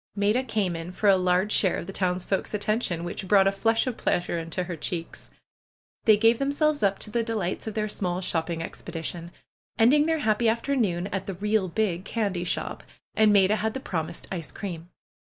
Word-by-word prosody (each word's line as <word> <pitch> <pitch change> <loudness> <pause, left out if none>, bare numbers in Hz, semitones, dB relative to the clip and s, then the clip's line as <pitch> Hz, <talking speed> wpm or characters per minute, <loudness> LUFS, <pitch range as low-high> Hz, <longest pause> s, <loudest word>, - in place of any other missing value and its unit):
Maida 210 +5 +2
came 200 -8 -1
in 165 +2 -6
for 205 +3 -1
a 195 - +7
large 185 +2 +1
share 190 -3 +3
of - - -5
the 195 - -7
townsfolks' 185 +2 -1
attention, 205 -4 -1
which 175 +2 -5
brought 195 0 +5
a 195 - +4
flush 225 +3 +1
of 255 -3 -3
pleasure 175 -1 0
into 165 +2 -3
her 175 -1 -5
cheeks. 165 +1 -5 0.8
They 215 -2 +7
gave 225 +2 +4
themselves 290 +2 +1
up 200 -1 +2
to 210 - -6
the 235 - +1
delights 220 -4 -3
of 220 - -4
their 215 -1 0
small 180 -3 -1
shopping 165 -2 -1
expedition, 170 +1 -6 0.5
ending 290 +7 +5
their 325 0 +2
happy 225 -4 +2
after 235 +5 0
noon 185 -8 0
at 195 -1 -3
the 195 - -4
'^real 205 -1 0
big" 185 -3 0
candy 200 -5 -2
shop, - - -2 0.3
and 215 -1 +4
Maida 200 +1 +4
had 220 +2 -2
the - - -2
promised 170 -8 -4
ice 170 -5 -4
cream. 175 -4 -7
195 Hz, 195 wpm, -26 LUFS, 175-220 Hz, 0.8 s, a